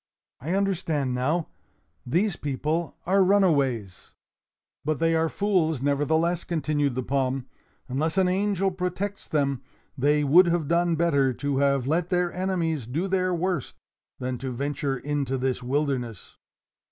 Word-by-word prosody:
I 160 +9 -2
understand 165 -9 0
now: 150 +7 0 0.6
these 180 - +1
people 150 +4 -2
are 195 +2 +4
runaways. 140 - +1 0.7
"But 155 0 0
they 165 0 +2
are 160 0 +2
fools, 180 -8 +1
nevertheless," 160 +5 +1
continued 150 -5 -1
the 130 - -2
palm. 130 0 -1 0.4
"Unless 155 +7 -1
an 190 -1 +4
angel 195 0 +1
protects 185 +2 -4
them, 140 -4 0 0.3
they 145 +2 +2
would 170 +6 +6
have 170 -3 0
done 170 +1 +2
better 140 -5 +2
to 140 +2 -2
have 140 -2 +2
let 165 +5 0
their 180 -1 +1
enemies 170 -8 -1
do 160 +10 -2
their 185 -1 +1
worst, 175 -4 -2 0.4
than 125 -1 -4
to 130 0 -4
venture 140 +1 -2
into 140 0 -2
this 130 0 -1
wilderness. 125 -5 -2
155 Hz, 140 wpm, -26 LUFS, 135-180 Hz, 0.7 s, would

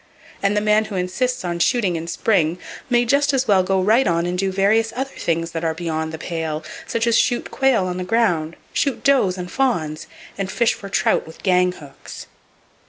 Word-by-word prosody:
And 200 +1 +1
the - - +2
man 215 +1 +3
who 210 - -7
insists 190 +6 -1
on 170 -1 -2
shooting 200 -3 +2
in 165 0 -4
spring 170 -3 +1 0.3
may 240 -1 +3
just 280 +3 +2
as 265 0 0
well 195 -2 +5
go 190 +1 0
right 220 +7 +3
on 170 -1 +1
and 175 0 -2
do 190 +1 0
various 215 +4 +2
other 270 +2 -3
things 165 0 -2
that 165 -1 -4
are 160 -1 0
beyond 160 -2 -3
the 160 - -6
pale, 160 -2 -4 0.2
such 230 0 -1
as 235 -1 +2
shoot 245 -1 +1
quail 265 -8 +2
on 180 0 -3
the 185 - -3
ground, 180 -6 +1 0.2
shoot 275 -3 -1
does 250 -10 +3
and 180 0 -6
fawns, 175 - -1 0.3
and 195 -1 -2
fish 235 +2 +2
for 200 - -9
trout 195 - +1
with 160 - -13
gang 180 -1 +3
hooks. 145 -5 -11
190 Hz, 205 wpm, -21 LUFS, 170-230 Hz, 0.3 s, well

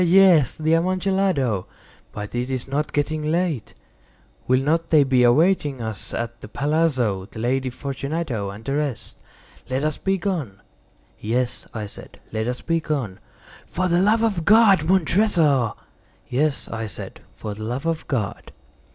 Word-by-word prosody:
"He! - - +2
he! 170 - +2
he!—he! 195 - +8
he! - - +8
he!—yes, 150 -6 +2
the 155 +1 +1
Amontillado. 180 - +1 0.4
But 105 0 -7
is 120 +1 -2
it 130 -2 -3
not 145 +2 -1
getting 150 +1 -1
late? 170 -7 -1 0.7
Will 130 +1 +3
not 165 +4 0
they 155 -3 +6
be 130 -2 +3
awaiting 145 +2 +3
us 110 -3 -5
at 120 0 -4
the - - -8
palazzo, 135 -8 0
the - - -13
Lady 130 +3 0
Fortunato 140 -4 -3
and 100 +3 -10
the 140 +1 -1
rest? 145 -5 -3 0.5
Let 130 +2 -1
us 155 -1 0
be 195 0 0
gone." 165 - -3 0.6
"Yes," 120 +3 -1
I 110 -2 -4
said, 100 - -12
"let 110 +1 -2
us 125 0 -3
be 165 0 0
gone." 135 -11 -3 0.5
"For 185 +1 -1
the 175 0 +3
love 220 +3 +3
of 200 -7 0
God, 200 -4 +6
Montressor!" 170 - +3 0.5
"Yes," 145 +3 0
I 115 0 -4
said, 95 - -8 0.2
"for 105 - -5
the 105 - -10
love 125 +7 -3
of 165 -1 -2
God!" 110 -8 -3
140 Hz, 170 wpm, -23 LUFS, 120-165 Hz, 0.7 s, he!—he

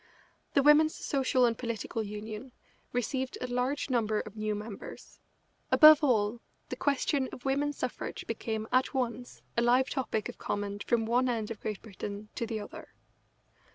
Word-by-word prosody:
The 280 - +5
Women's 300 +2 +6
Social 260 -2 +2
and 230 -1 +2
Political 230 -1 -3
Union 215 +4 -6 0.4
received 260 +2 -2
a - - -3
large 250 +3 -1
number 215 -3 +1
of 215 - -7
new 215 -1 -1
members. 210 0 -9 0.5
Above 310 0 +9
all, 230 -3 +2 0.3
the - - -3
question 280 -1 0
of 250 - -10
women's 285 +2 0
suffrage - - -4
became 220 -2 -3
at 255 +2 +2
once 245 -1 -3
a 235 - +2
live 250 +3 +3
topic 250 -6 -1
of - - -9
comment 205 0 -3
from 230 -2 +2
one 250 +3 +2
end 225 -2 -2
of 225 - -6
Great 210 -2 -5
Britain 205 0 -7
to 230 - -3
the 220 -1 -3
other. 205 - -10
235 Hz, 160 wpm, -30 LUFS, 215-260 Hz, 0.5 s, Above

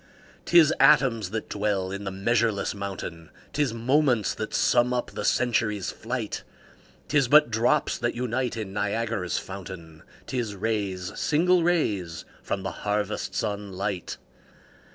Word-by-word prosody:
'Tis 170 -3 +6
atoms 115 -8 +4
that 110 +2 -4
dwell 100 -2 -1
in 100 +1 -5
the - - -1
measureless 110 +2 0
mountain, 95 -5 -6 0.2
'Tis 145 -4 +1
moments 125 0 +2
that 110 - -5
sum 125 +1 +3
up 125 - -2
the - - -5
century's 110 -5 +1
flight; 115 -2 -4 0.6
'Tis 145 -4 +2
but 150 -1 +6
drops 115 +2 +1
that 120 - -1
unite 125 0 -2
in 105 -3 -5
Niagara's 105 -3 -1
fountain, 85 -4 -8 0.2
'Tis 120 -5 -3
rays, 100 -3 -2
single 175 +4 +3
rays, 105 - 0 0.2
from 95 - -3
the - - -3
harvest 105 0 -2
sun 100 -2 -3
light. 95 -2 -3
110 Hz, 130 wpm, -26 LUFS, 100-120 Hz, 0.6 s, Tis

